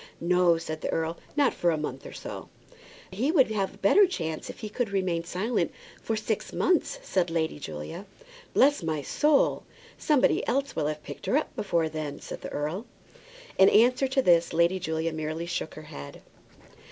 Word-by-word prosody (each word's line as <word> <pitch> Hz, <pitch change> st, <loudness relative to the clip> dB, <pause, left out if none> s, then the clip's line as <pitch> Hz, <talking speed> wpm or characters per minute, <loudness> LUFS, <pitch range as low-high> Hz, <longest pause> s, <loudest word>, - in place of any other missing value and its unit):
"No," 175 Hz, 0 st, +3 dB
said 155 Hz, -1 st, -5 dB
the -, -, -3 dB
earl; 165 Hz, +1 st, -2 dB, 0.2 s
"not 285 Hz, -2 st, +4 dB
for 175 Hz, -, +1 dB
a 160 Hz, -, +1 dB
month 135 Hz, -3 st, -5 dB
or -, -, -9 dB
so." -, -, -8 dB, 0.6 s
"He 240 Hz, +11 st, 0 dB
will 285 Hz, -7 st, +5 dB
have 195 Hz, -2 st, -1 dB
a -, -, -18 dB
better 390 Hz, -, +5 dB
chance 160 Hz, -, -4 dB
if -, -, -9 dB
he 215 Hz, -, -4 dB
can 225 Hz, +2 st, -2 dB
remain 185 Hz, -4 st, 0 dB
silent 185 Hz, +2 st, -1 dB, 0.3 s
for 225 Hz, -, -1 dB
six 215 Hz, 0 st, -2 dB
months," 360 Hz, +6 st, +1 dB
said 185 Hz, -, 0 dB
Lady 160 Hz, -2 st, -1 dB
Julia. 80 Hz, -, -7 dB, 0.5 s
"Bless 285 Hz, -1 st, +5 dB
my 155 Hz, -3 st, -2 dB
soul! 295 Hz, -, +2 dB, 0.4 s
somebody 295 Hz, -4 st, +3 dB
else 275 Hz, +2 st, 0 dB
will 150 Hz, -, 0 dB
have 150 Hz, 0 st, -4 dB
picked -, -, -9 dB
her 270 Hz, -, +3 dB
up 305 Hz, -, -3 dB
before 170 Hz, -5 st, 0 dB
that," 155 Hz, -2 st, -5 dB
said -, -, -7 dB
the -, -, -6 dB
earl. 155 Hz, +10 st, -3 dB, 0.7 s
In 190 Hz, -, +8 dB
answer 250 Hz, +5 st, +4 dB
to 265 Hz, 0 st, +1 dB
this 170 Hz, -4 st, +4 dB
Lady 170 Hz, +3 st, +3 dB
Julia 160 Hz, -1 st, -2 dB
merely 155 Hz, +1 st, -3 dB
shook 170 Hz, -2 st, -4 dB
her 155 Hz, -, -9 dB
head. 70 Hz, -, -10 dB
175 Hz, 185 wpm, -27 LUFS, 160-230 Hz, 0.7 s, In